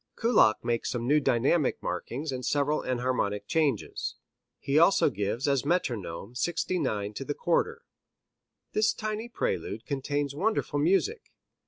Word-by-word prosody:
Kullak 225 - +4
makes 120 -1 0
some 120 -1 -2
new 150 +4 +4
dynamic 135 +4 +2
markings 140 +4 -3
and 130 -1 -4
several 145 +2 +1
enharmonic 125 -5 -1
changes. 150 - -1 0.4
He 140 +2 +1
also 170 -3 +5
gives 105 +5 -2
as 140 -2 +2
metronome 120 - -2
69 130 - -1
to 135 - -5
the - - -3
quarter. 470 -1 0 0.9
This 215 0 +3
tiny 215 +2 -4
prelude 105 - -3
contains 140 0 -2
wonderful 175 -3 0
music. 195 - +1
140 Hz, 130 wpm, -28 LUFS, 120-175 Hz, 0.9 s, also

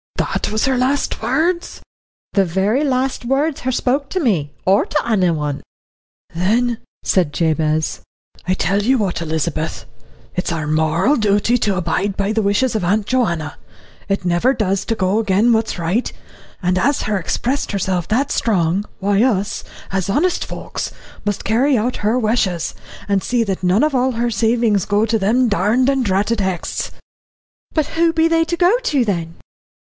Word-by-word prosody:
'" - - -71
"That - - -2
was 215 0 +1
her 265 -1 +1
last 265 +3 0
words?" 320 +10 0 0.5
"The 195 -2 +3
very 195 - +1
last 260 -2 0
words 275 +4 0
her 260 - -1
spoke 265 +3 0
to 375 - -1
me 180 - 0
or 195 +2 +4
to 300 - -1
anyone." 165 -9 0 0.7
"Then," 225 +7 +1 0.2
said 175 -6 +1
Jabez, 155 -1 0 0.5
"I'll 185 - +2
tell 195 +4 +1
ye 255 +6 +3
what, 195 -8 -1
Elizabeth, 160 0 -2 0.5
it's 180 - -1
our 160 -2 -2
moral 160 - +2
dooty 210 +2 +2
to 205 -3 +1
abide 185 +3 -1
by 200 +2 0
the 220 - +1
wishes 210 +5 +1
of 215 - 0
Aunt 200 +4 +1
Joanna. 170 - -1 0.5
It 195 -2 -1
never 175 +9 +2
does 195 -5 0
to 225 - -1
go 195 +1 +1
agin 215 +2 +3
what 220 0 +1
is - - -5
right. 180 +9 0 0.5
And 180 0 +1
as 280 +10 +1
her 210 -1 0
expressed 250 - -2
herself 185 -4 -1
that 255 +6 +1
strong, 190 -3 +1
why 200 +2 +2
us, 205 -6 0 0.3
as 190 0 -1
honest 345 - +1
folks, - - -5 0.3
must 205 -2 -2
carry 250 +5 +3
out 240 +4 -1
her 215 +4 +1
wishes, 215 -7 0 0.3
and 200 -2 +1
see 245 -2 +1
that 195 -3 -3
none 185 +7 +3
of 305 -1 +1
all 255 0 +1
her 235 +1 -1
savings 225 -2 +2
go 210 +1 +2
to 225 0 0
them 235 +6 +2
darned 220 +6 +2
and 270 -2 +1
dratted 205 +2 +1
Hexts." 190 -3 -2 0.8
"But 310 -3 +1
who 335 0 +4
be 325 0 +3
they 330 0 +3
to 340 +1 -2
go 360 +5 +4
to, 290 - +1
then?" 170 -5 -2
210 Hz, 170 wpm, -19 LUFS, 185-250 Hz, 0.8 s, or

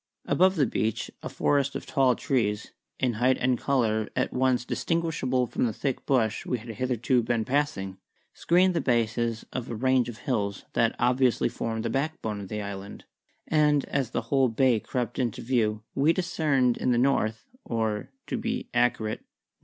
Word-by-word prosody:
Above 185 +2 +3
the 150 -5 +3
beach 110 -2 -2
a - - -5
forest 140 0 +1
of - - -4
tall 130 -4 +3
trees, 110 -6 -1 0.3
in 125 -3 +1
height 130 +1 +4
and 125 -1 +1
colour 110 -6 +1
at - - 0
once 125 -1 +1
distinguishable 155 -8 0
from 120 - 0
the 110 - -3
thick 135 +4 -3
bush 115 -6 +1
we 125 - -1
had 115 +1 -11
hitherto 125 +2 +1
been 115 -1 0
passing, 125 -9 -1 0.3
screened 180 +2 +3
the 165 - 0
bases 115 -2 0
of 125 -2 -4
a 115 - -3
range 130 +1 +2
of 115 - -8
hills 100 -7 -2
which 115 -1 +2
obviously 125 0 +2
formed 115 0 -3
the - - 0
backbone 135 -7 -2
of 100 - -7
the 105 +1 -4
island; 100 0 -7 0.4
and 150 -2 +3
as 135 -4 0
the - - -2
whole 135 -2 +4
bay 120 0 +3
crept 120 +2 -3
into 120 -4 -1
view 110 -4 0
we 140 +4 +3
discerned 150 -9 +1
in 125 - +1
the 120 - +3
north 115 -4 +1 0.2
(or, 110 -2 -2 0.2
to 255 - -3
be 235 +2 -3
accurate, 120 -3 +1
N.N. - - -34
125 Hz, 175 wpm, -27 LUFS, 110-135 Hz, 0.4 s, height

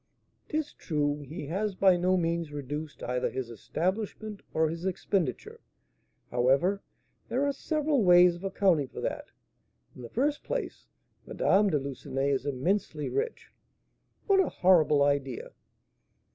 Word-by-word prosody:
'Tis 305 -1 -2
true, 145 -2 -1
he 150 +3 -7
has 195 +6 -2
by 190 -1 +5
no 180 +1 +2
means 165 -2 -1
reduced 145 +2 -6
either 125 0 -1
his 130 -3 -5
establishment 200 - -3
or 160 0 +2
his 165 +2 -5
expenditure; 185 - -2 0.7
however, 135 +11 +2 0.5
there 255 +4 +1
are 285 - +1
several 300 -2 0
ways 180 -1 +7
of 175 +2 -11
accounting 190 -7 +2
for - - -9
that; - - -3 0.7
in - - -11
the 120 - -8
first 290 +5 0
place, - - -4 0.4
Madame 200 +1 +3
de 150 - +2
Lucenay 140 0 -2
is 135 +1 -1
immensely 150 +3 -1
rich." 455 +3 -3 0.7
"What 395 -2 +4
a 380 - +3
horrible 155 -6 +4
idea!" 140 -3 -1
170 Hz, 135 wpm, -29 LUFS, 145-205 Hz, 0.7 s, ways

